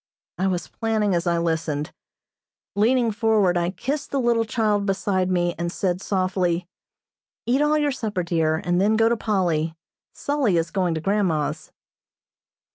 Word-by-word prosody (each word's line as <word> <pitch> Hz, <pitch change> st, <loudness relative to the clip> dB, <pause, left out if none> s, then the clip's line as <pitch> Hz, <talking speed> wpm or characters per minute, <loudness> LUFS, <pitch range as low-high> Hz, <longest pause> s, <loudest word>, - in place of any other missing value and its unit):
I 190 Hz, -, +1 dB
was 180 Hz, -2 st, -2 dB
planning 220 Hz, -3 st, 0 dB
as 175 Hz, 0 st, 0 dB
I 170 Hz, 0 st, +2 dB
listened. 160 Hz, -3 st, -2 dB, 0.8 s
Leaning 230 Hz, +3 st, +3 dB
forward 215 Hz, -4 st, +2 dB
I 175 Hz, 0 st, +1 dB
kissed 275 Hz, +9 st, -3 dB
the 275 Hz, -, -1 dB
little 235 Hz, -2 st, +2 dB
child 210 Hz, -2 st, 0 dB
beside 190 Hz, -1 st, 0 dB
me, 175 Hz, -1 st, +1 dB
and 170 Hz, 0 st, -2 dB
said 180 Hz, 0 st, -1 dB
softly, 185 Hz, -3 st, 0 dB, 0.8 s
"Eat 255 Hz, +4 st, +2 dB
all 300 Hz, +1 st, +3 dB
your 295 Hz, -1 st, +1 dB
supper, 215 Hz, -8 st, -3 dB
dear, 165 Hz, -2 st, +1 dB
and 175 Hz, +2 st, 0 dB
then 210 Hz, +2 st, +3 dB
go 225 Hz, +1 st, +4 dB
to 235 Hz, -, +2 dB
Polly. 175 Hz, -7 st, 0 dB, 0.4 s
'Sully' 275 Hz, -11 st, +1 dB
is 165 Hz, 0 st, -1 dB
going 180 Hz, -4 st, 0 dB
to 160 Hz, -, -3 dB
grandma's." 180 Hz, -6 st, -1 dB
190 Hz, 155 wpm, -23 LUFS, 175-225 Hz, 0.8 s, go